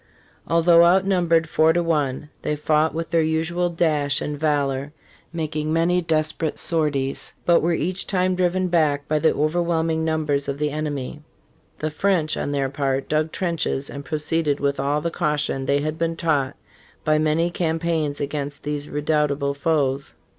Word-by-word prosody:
Although 170 0 +5
outnumbered 175 -2 +3
four 160 +1 +3
to 175 +1 +1
one, 150 -3 -1
they 150 - -1
fought 155 +1 +1
with 165 0 -4
their 165 -1 +3
usual 165 +3 0
dash 155 -4 +1
and 150 - -3
valor, 145 -2 -1 0.4
making 155 -2 -3
many 170 +2 +2
desperate 155 -1 -1
sorties, 140 -4 -1
but 170 -1 +5
were 170 +2 +1
each 180 +4 -2
time 185 -1 +1
driven 185 0 +1
back 150 -5 +1
by 155 0 +1
the 160 - +3
overwhelming 160 +1 0
numbers 155 -3 0
of 140 - -2
the 150 0 -1
enemy. 150 -1 -4 0.6
The 155 0 -3
French, 165 -1 +1
on - - -3
their 140 -1 0
part, 135 0 -1
dug 155 +1 +1
trenches 165 -6 -2
and 140 - -7
proceeded 150 -1 -1
with 140 -1 0
all 145 +2 0
the 170 - -2
caution 150 -4 -1
they 140 0 +2
had 155 +1 -3
been 165 0 0
taught 145 -5 0 0.5
by 155 0 +3
many 155 +3 +1
campaigns 160 -3 -1
against 145 0 -4
these 145 0 -3
redoubtable 150 -1 0
foes. 140 - -1
155 Hz, 160 wpm, -23 LUFS, 145-165 Hz, 0.6 s, Although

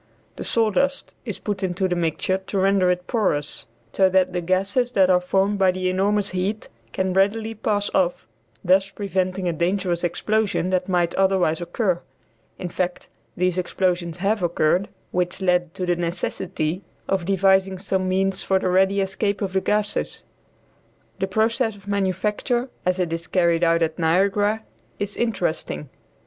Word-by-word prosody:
The - - -6
sawdust 230 +5 +1
is 215 -5 -4
put 205 -2 -4
into 185 0 0
the 180 - -1
mixture 175 +3 0
to 200 - -2
render 190 -1 +3
it 180 0 0
porous 180 - -1 0.3
so 190 -1 +4
that 185 -1 +2
the 180 - -1
gases 195 +8 0
that 190 -3 +4
are 180 0 +4
formed 195 +3 +1
by 190 -1 +5
the 185 0 0
enormous 200 +2 +1
heat 190 +4 -2 0.2
can 190 +4 -1
readily 215 +4 +1
pass 205 -1 -1
off, 180 -2 +1 0.4
thus 190 +2 +3
preventing 190 -2 -2
a 170 - +1
dangerous 175 +1 0
explosion 200 +1 0
that 185 0 0
might 175 -2 +1
otherwise 190 -4 +2
occur. 175 0 -1 0.6
In 180 - -4
fact, 180 +1 -3 0.3
these 180 0 +1
explosions 175 -2 -1
have 200 +3 0
occurred, 175 +2 +1 0.2
which 180 0 -1
led 180 -3 +1
to 185 - -2
the 175 0 +1
necessity 170 0 -2 0.3
of 190 -3 0
devising 190 0 +3
some 190 0 -1
means 190 0 +1
for 190 - +2
the 185 - 0
ready 190 +2 +3
escape 200 +1 -1
of 195 -2 -3
the 190 - +2
gases. 210 +1 -1 1.0
The 190 - 0
process 220 +3 +1
of 200 0 -17
manufacture 205 +6 0 0.2
as 180 0 +2
it 175 -3 -1
is 165 +1 -4
carried 170 -2 +2
on 165 0 +3
at 160 0 -2
Niagara 200 +6 +2 0.3
is 205 0 -3
interesting. 175 - -2
190 Hz, 160 wpm, -23 LUFS, 180-200 Hz, 1.0 s, by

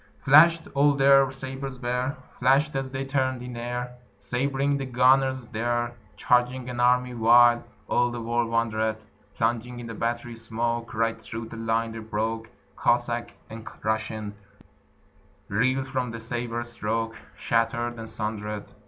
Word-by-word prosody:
Flashed 160 +4 +7
all 145 0 +4
their 135 -1 +5
sabres 135 0 -6
bare, 125 +3 -2 0.2
Flashed 135 +4 +3
as 135 -1 -2
they 135 +1 -4
turned 130 -2 -1
in 125 -1 -7
air, 125 +1 -4 0.2
Sab'ring 135 +7 0
the 135 - -3
gunners 130 +1 +3
there, 120 +2 -1 0.2
Charging 125 +1 +1
an 120 - -6
army, 125 0 +3
while 120 +1 +5 0.2
All 120 0 +2
the 120 0 -5
world 120 0 0
wondered: 110 -1 0 0.4
Plunging 120 +1 -1
in 120 - -7
the 115 - -6
battery 120 +1 -3
smoke, 115 +1 -3
Right 115 0 0
through 115 0 -7
the 115 - -8
line 115 0 0
they 115 - -7
broke; 110 +1 -3 0.3
Cossack 120 0 0
and 110 0 -9 0.2
Russian 110 -1 -2 1.2
Reeled 130 +6 +1
from 130 -3 -2
the 115 0 -6
sabre 120 0 -3
stroke 115 -1 -3 0.2
Shattered 115 +1 0
and 110 0 -7
sundered. 105 -1 -4
120 Hz, 145 wpm, -26 LUFS, 115-130 Hz, 1.2 s, Flashed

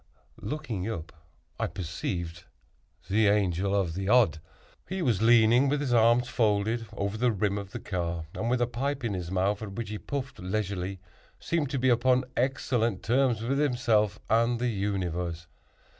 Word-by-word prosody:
Looking 120 -10 -4
up, 85 -6 -6 0.5
I - - 0
perceived 85 -1 -5 0.6
the 105 +2 +3
Angel 100 -1 +2
of 95 -5 0
the 95 +3 -3
Odd. 110 -11 +4 0.5
He 190 -1 -2
was 115 - +1
leaning 120 +3 +5
with 145 +1 +1
his 135 -4 -1
arms 120 +1 +4
folded, 110 0 +1
over 100 0 -2
the 125 0 +3
rim 100 -1 0
of 100 -1 -8
the - - -5
car; 85 -3 -3
and 115 - -2
with 125 0 +2
a - - +3
pipe 135 +3 -3
in 115 -3 -1
his 90 -3 -4
mouth, 95 +3 0
at 105 -3 -6
which 115 0 -5
he 105 -1 -5
puffed 135 -2 -5
leisurely, 95 -1 -3 0.4
seemed 160 -5 -1
to 140 - -2
be 130 0 +2
upon 125 +2 +3
excellent 120 -5 0
terms 120 -1 +2
with 135 +4 0
himself 115 -7 +2
and 115 +2 +2
the 125 0 0
universe. 90 -5 -2
110 Hz, 170 wpm, -28 LUFS, 95-125 Hz, 0.6 s, leaning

